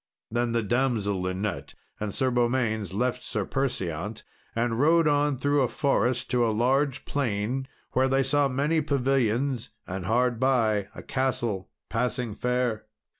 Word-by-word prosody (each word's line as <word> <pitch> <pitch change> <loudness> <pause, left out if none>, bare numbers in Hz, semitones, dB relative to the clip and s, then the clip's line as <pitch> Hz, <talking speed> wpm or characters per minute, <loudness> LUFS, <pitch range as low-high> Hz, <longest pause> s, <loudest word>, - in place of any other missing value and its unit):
Then 120 +1 0
the 115 -1 +1
damsel 110 -5 0
Linet 95 -5 -3 0.2
and 105 -1 -2
Sir 130 +5 0
Beaumains 120 -4 +1
left 125 +5 -1
Sir 105 -5 -3
Perseant, 105 - -2 0.3
and 115 0 0
rode 165 +3 +5
on 145 -1 +2
through 145 +2 +2
a 130 - +3
forest 125 -1 +1
to 125 -1 +3
a 115 - +3
large 130 +5 +1
plain, 125 0 -1 0.2
where 130 +1 +3
they 135 +1 +2
saw 140 +2 +2
many 145 +5 +1
pavilions, 135 -3 +1 0.2
and 95 0 -5
hard 120 +1 +2
by, 115 -6 +2
a - - -8
castle 120 -8 -1 0.2
passing 125 -1 -1
fair. 125 -2 -1
125 Hz, 145 wpm, -27 LUFS, 110-135 Hz, 0.3 s, rode